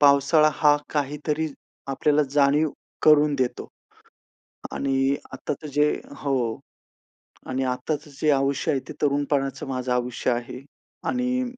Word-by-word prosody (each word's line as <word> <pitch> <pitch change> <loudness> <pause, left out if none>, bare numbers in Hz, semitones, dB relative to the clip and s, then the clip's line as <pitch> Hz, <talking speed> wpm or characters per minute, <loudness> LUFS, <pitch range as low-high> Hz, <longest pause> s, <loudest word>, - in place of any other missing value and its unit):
पावसाळा 145 +2 +5
हा 145 +1 +5 0.2
काहीतरी 150 +2 -1 0.4
आपल्याला 150 +2 +2
जाणीव 145 +2 +3 0.3
करून 150 -1 +5
देतो. 125 -1 -1 1.1
आणि 135 0 +1 0.2
आत्ताचं 150 - -5
जे 150 0 +3 0.3
हो, 125 -5 -1 0.9
आणि 130 +1 -1
आत्ताचं 145 +4 -3
जे 155 - +3
आयुष्य 140 +1 +1
आहे 135 - 0
ते - - -5
तरुणपणाचं 140 -2 0
माझं 130 -1 -2
आयुष्य 125 0 -1
आहे. 120 +1 -4 0.5
आणि 250 0 0
140 Hz, 115 wpm, -24 LUFS, 135-150 Hz, 1.1 s, पावसाळा